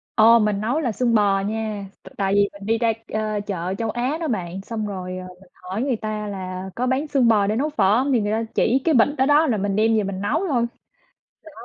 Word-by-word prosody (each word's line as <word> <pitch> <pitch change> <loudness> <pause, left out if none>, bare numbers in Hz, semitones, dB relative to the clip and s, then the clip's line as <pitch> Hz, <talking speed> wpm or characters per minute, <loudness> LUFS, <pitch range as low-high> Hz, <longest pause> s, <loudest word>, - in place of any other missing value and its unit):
Ồ, 230 +1 +7
mình 210 -2 0
nấu 245 +8 0
là 255 -7 -1
xương 235 +2 0
bò 200 -2 +3
nha. 215 0 -3 0.2
T - - -16
tại 195 -1 0
vì 200 0 +3
mình 200 0 -11
đi 225 +1 +1
ra, 225 -1 +1 0.2
ơ, 215 -1 -1
chợ 185 -2 -3
Châu 225 -1 -2
Á 245 +7 -1
đó 325 - -2
bạn, 185 -5 -3
xong 215 +1 -4
rồi, 185 -2 -5
ờ, 185 0 -7
mình 190 - -19
hỏi 185 +5 -6
người 265 -3 0
ta 215 -1 -4
là 185 -1 -5
có 250 +2 -1
bán 270 +4 0
xương 270 -5 +2
bò 210 -3 +4
để 210 - 0
nấu 285 +6 0
phở 215 -8 +3
hông, 270 +3 +1
thì 230 - +3
người 205 0 -1
ta 225 +1 0
chỉ 260 +3 +2
cái 325 - +3
bịch 235 - +5
đó, 265 - +3
đó 295 +3 +4
là 225 -6 +1
mình 200 0 -1
đem 220 +1 +3
về 215 - +1
mình 195 0 -4
nấu 325 - 0
thôi. 245 -7 +1 0.8
Đó. 320 - -12
215 Hz, 265 wpm, -22 LUFS, 200-245 Hz, 0.8 s, Ồ